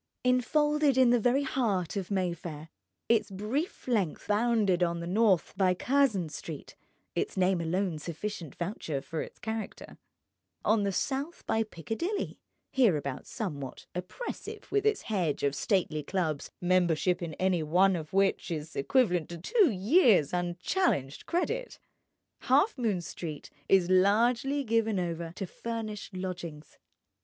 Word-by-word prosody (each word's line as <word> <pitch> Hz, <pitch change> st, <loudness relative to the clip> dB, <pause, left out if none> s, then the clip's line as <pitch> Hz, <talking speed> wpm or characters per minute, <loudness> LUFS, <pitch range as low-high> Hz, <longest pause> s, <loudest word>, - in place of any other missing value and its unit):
Enfolded 290 Hz, +3 st, +3 dB
in 255 Hz, -2 st, +6 dB
the 245 Hz, -, +4 dB
very 245 Hz, +5 st, +2 dB
heart 215 Hz, -, 0 dB
of 195 Hz, -3 st, -3 dB
Mayfair, 170 Hz, -5 st, -3 dB, 0.4 s
its 230 Hz, -2 st, +3 dB
brief 215 Hz, -, -3 dB
length 205 Hz, -10 st, 0 dB
bounded 210 Hz, -4 st, +2 dB
on 170 Hz, -1 st, +1 dB
the 170 Hz, -, -5 dB
north 190 Hz, -1 st, +2 dB
by 185 Hz, -2 st, +3 dB
Curzon 245 Hz, -, +2 dB
Street 155 Hz, -1 st, -8 dB, 0.4 s
(its -, -, -2 dB
name 185 Hz, -1 st, +2 dB
alone 170 Hz, 0 st, -1 dB
sufficient 170 Hz, -1 st, -5 dB
voucher 170 Hz, -5 st, -3 dB
for 160 Hz, +3 st, -4 dB
its -, -, -8 dB
character), 220 Hz, -1 st, -6 dB, 0.7 s
on 215 Hz, 0 st, +4 dB
the 200 Hz, -1 st, 0 dB
south 275 Hz, -, -2 dB
by 225 Hz, -, +1 dB
Piccadilly 225 Hz, -, -3 dB, 0.3 s
(hereabouts 155 Hz, -, +1 dB
somewhat 145 Hz, -, -5 dB
oppressive 180 Hz, -, -6 dB
with 415 Hz, 0 st, +2 dB
its 425 Hz, -1 st, +1 dB
hedge 180 Hz, -9 st, -1 dB
of 140 Hz, -1 st, +2 dB
stately 160 Hz, -1 st, 0 dB
clubs, 155 Hz, -3 st, -2 dB
membership 180 Hz, 0 st, +2 dB
in 165 Hz, -3 st, -4 dB
any 185 Hz, -2 st, +1 dB
one 180 Hz, +5 st, +3 dB
of 155 Hz, -3 st, -5 dB
which 195 Hz, 0 st, +2 dB
is 155 Hz, -2 st, -5 dB
equivalent 180 Hz, -, +2 dB
to 170 Hz, -, -6 dB
two 380 Hz, -, +3 dB
years' 210 Hz, -, +4 dB
unchallenged 175 Hz, -, -1 dB
credit) 460 Hz, +9 st, -1 dB, 0.7 s
Halfmoon 230 Hz, -, +2 dB
Street 160 Hz, -3 st, -7 dB, 0.2 s
is 190 Hz, -3 st, +5 dB
largely 235 Hz, +9 st, +3 dB
given 225 Hz, -4 st, +1 dB
over 170 Hz, -1 st, -3 dB
to 195 Hz, -, -3 dB
furnished 215 Hz, 0 st, -5 dB
lodgings. 175 Hz, -5 st, -6 dB
190 Hz, 135 wpm, -30 LUFS, 170-235 Hz, 0.7 s, in